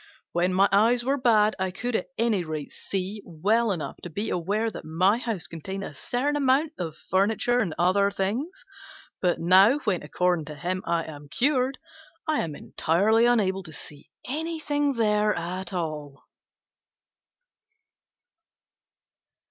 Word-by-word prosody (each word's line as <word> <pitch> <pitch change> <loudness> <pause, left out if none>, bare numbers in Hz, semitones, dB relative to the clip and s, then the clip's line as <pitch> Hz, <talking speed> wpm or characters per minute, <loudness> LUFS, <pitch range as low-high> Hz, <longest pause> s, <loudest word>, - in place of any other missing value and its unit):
When 175 +2 +1
my 195 +2 +4
eyes 230 +4 +3
were 275 +2 +2
bad 220 -4 +4
I 190 0 0
could 235 +6 -3
at 185 - -1
any 220 -5 +1
rate 155 -3 -5
see 195 +2 -4
well 205 +7 +1
enough 170 -6 -4
to 175 - -7
be 205 +7 -3
aware 205 +6 -1
that - - -8
my 185 +8 +2
house 225 -8 -3
contained 190 +4 -5
a - - -7
certain 255 - -1
amount 290 +2 +2
of 165 -4 -4
furniture 220 +6 +2
and 175 -10 -1
other 195 +3 +3
things; 235 - -3 0.6
but 180 -2 +1
now, 190 +9 +6
when 190 -5 0
according 175 +1 0
to 150 0 -8
him 180 +6 -2
I 170 -1 +1
am 145 -2 -10
cured, 260 - +1 0.5
I 310 -1 +1
am 155 -3 -3
entirely 215 +13 +2
unable 195 -6 +2
to 170 -4 -10
see 145 -1 -8 0.2
anything 295 -1 -1
there 210 -3 +2
at 180 +2 -4
all." 155 -5 -5
195 Hz, 145 wpm, -26 LUFS, 175-235 Hz, 0.6 s, now